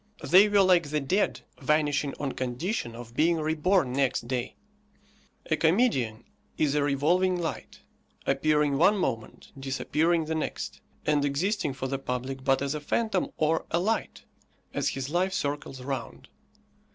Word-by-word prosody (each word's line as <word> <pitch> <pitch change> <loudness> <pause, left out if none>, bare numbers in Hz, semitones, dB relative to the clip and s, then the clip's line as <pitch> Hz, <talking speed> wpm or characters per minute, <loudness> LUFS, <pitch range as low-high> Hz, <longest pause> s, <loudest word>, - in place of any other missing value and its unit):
They 195 +4 +6
were 205 -1 +5
like 175 -5 +4
the 150 +1 0
dead, 185 +9 0 0.2
vanishing 145 0 +1
on 140 -2 -2
condition 130 - -3
of 115 0 -10
being 165 +6 +3
reborn 160 -1 +1
next 135 -3 0
day. 125 -1 -3 1.0
A - - +5
comedian 155 - +1 0.3
is 150 -3 +2
a 150 - +2
revolving 170 +6 +2
light, 165 -2 -5 0.4
appearing 145 0 +2
one 200 +5 +5
moment, 115 - -3
disappearing 155 +5 0
the 160 - -2
next, 160 - -4 0.2
and 150 -1 +2
existing 150 +2 0
for 130 0 -5
the 135 0 -2
public 130 +1 -4
but 135 0 +2
as 140 +1 -1
a 150 - -4
phantom 205 +4 0
or 160 +1 +1
a 170 - +1
light, 215 +6 -1 0.5
as - - 0
his 135 +1 -4
life 185 +3 +1
circles 145 -5 -3
round. 135 -3 -5
150 Hz, 150 wpm, -27 LUFS, 135-175 Hz, 1.0 s, They